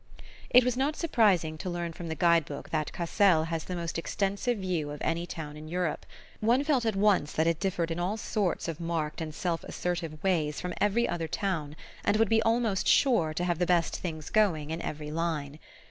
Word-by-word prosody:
It 250 Hz, -, +7 dB
was 250 Hz, 0 st, 0 dB
not 275 Hz, +4 st, 0 dB
surprising 195 Hz, -, +2 dB
to 185 Hz, -, -4 dB
learn 175 Hz, -1 st, -3 dB
from 170 Hz, +1 st, -7 dB
the 160 Hz, -, -3 dB
guide 170 Hz, 0 st, +4 dB
book 140 Hz, -1 st, -8 dB
that 155 Hz, -2 st, -1 dB
Cassel 175 Hz, -1 st, +3 dB
has 165 Hz, -1 st, -3 dB
the 180 Hz, -, -4 dB
most 170 Hz, -1 st, -3 dB
extensive 200 Hz, +7 st, -1 dB
view 180 Hz, -6 st, -2 dB
of 145 Hz, 0 st, -6 dB
any 170 Hz, +1 st, -1 dB
town 150 Hz, -4 st, -6 dB
in 155 Hz, +1 st, -9 dB
Europe: 175 Hz, -1 st, -2 dB, 0.3 s
one 240 Hz, +5 st, +3 dB
felt 270 Hz, -6 st, +1 dB
at 220 Hz, -, +1 dB
once 195 Hz, -7 st, +3 dB
that 160 Hz, -, +1 dB
it 165 Hz, -1 st, +1 dB
differed 175 Hz, -3 st, -1 dB
in 165 Hz, -, -2 dB
all 185 Hz, +5 st, -1 dB
sorts 200 Hz, -5 st, -1 dB
of 165 Hz, -1 st, -4 dB
marked 165 Hz, -2 st, -2 dB
and 160 Hz, -1 st, -4 dB
self 170 Hz, -1 st, -2 dB
assertive 170 Hz, -3 st, -4 dB
ways 160 Hz, -6 st, +1 dB
from 180 Hz, -1 st, -4 dB
every 215 Hz, +4 st, +3 dB
other 165 Hz, -2 st, -2 dB
town, 155 Hz, -4 st, -2 dB, 0.3 s
and 210 Hz, -, +2 dB
would 225 Hz, -2 st, +3 dB
be 225 Hz, 0 st, +4 dB
almost 225 Hz, -4 st, +1 dB
sure 230 Hz, -, +4 dB
to 175 Hz, -, -1 dB
have 175 Hz, -2 st, 0 dB
the 180 Hz, -, +1 dB
best 175 Hz, -2 st, +2 dB
things 155 Hz, -3 st, -5 dB
going 165 Hz, -9 st, +2 dB
in 165 Hz, +1 st, -3 dB
every 150 Hz, 0 st, -5 dB
line. 155 Hz, -3 st, -2 dB
175 Hz, 210 wpm, -29 LUFS, 160-200 Hz, 0.3 s, It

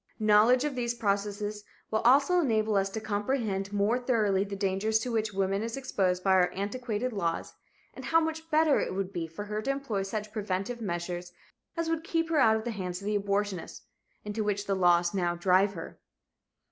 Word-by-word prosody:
Knowledge 215 Hz, +4 st, +5 dB
of 295 Hz, -1 st, -1 dB
these 240 Hz, -2 st, -2 dB
processes 205 Hz, 0 st, -2 dB, 0.3 s
will 220 Hz, -, +2 dB
also 280 Hz, +10 st, +4 dB
enable 220 Hz, -8 st, +1 dB
us 195 Hz, 0 st, +2 dB
to 220 Hz, -, -4 dB
comprehend 205 Hz, -2 st, -2 dB
more 205 Hz, +4 st, +1 dB
thoroughly 215 Hz, -6 st, +1 dB
the 200 Hz, 0 st, -6 dB
dangers 195 Hz, +2 st, +1 dB
to 240 Hz, +2 st, -3 dB
which 220 Hz, -1 st, 0 dB
woman 195 Hz, 0 st, 0 dB
is 230 Hz, +3 st, -4 dB
exposed 185 Hz, -9 st, 0 dB
by 195 Hz, -, +3 dB
our 185 Hz, -1 st, +4 dB
antiquated 225 Hz, +4 st, -3 dB
laws, 170 Hz, -5 st, -2 dB, 0.4 s
and -, -, -9 dB
how 330 Hz, -, +4 dB
much 320 Hz, 0 st, -3 dB
better 310 Hz, -1 st, +4 dB
it -, -, -2 dB
would 195 Hz, 0 st, -3 dB
be 170 Hz, -3 st, -3 dB
for 165 Hz, +6 st, -7 dB
her 210 Hz, +1 st, -3 dB
to 245 Hz, -, -4 dB
employ 275 Hz, -7 st, -1 dB
such 210 Hz, +2 st, -4 dB
preventive 210 Hz, +2 st, -3 dB
measures 175 Hz, -2 st, -4 dB, 0.4 s
as 335 Hz, 0 st, -1 dB
would 325 Hz, -1 st, -1 dB
keep 330 Hz, -1 st, -1 dB
her 315 Hz, -, +3 dB
out 220 Hz, -4 st, +5 dB
of 220 Hz, -, -2 dB
the 240 Hz, -, -3 dB
hands 180 Hz, -4 st, -4 dB
of 200 Hz, -, -10 dB
the 210 Hz, 0 st, 0 dB
abortionist, 200 Hz, -2 st, -2 dB, 0.4 s
into 210 Hz, +1 st, -2 dB
which 205 Hz, -1 st, -1 dB
the 200 Hz, -, 0 dB
laws 175 Hz, -1 st, +3 dB
now 175 Hz, -3 st, 0 dB
drive 185 Hz, +3 st, +3 dB
her. 165 Hz, -3 st, -9 dB
210 Hz, 195 wpm, -29 LUFS, 195-235 Hz, 0.4 s, Knowledge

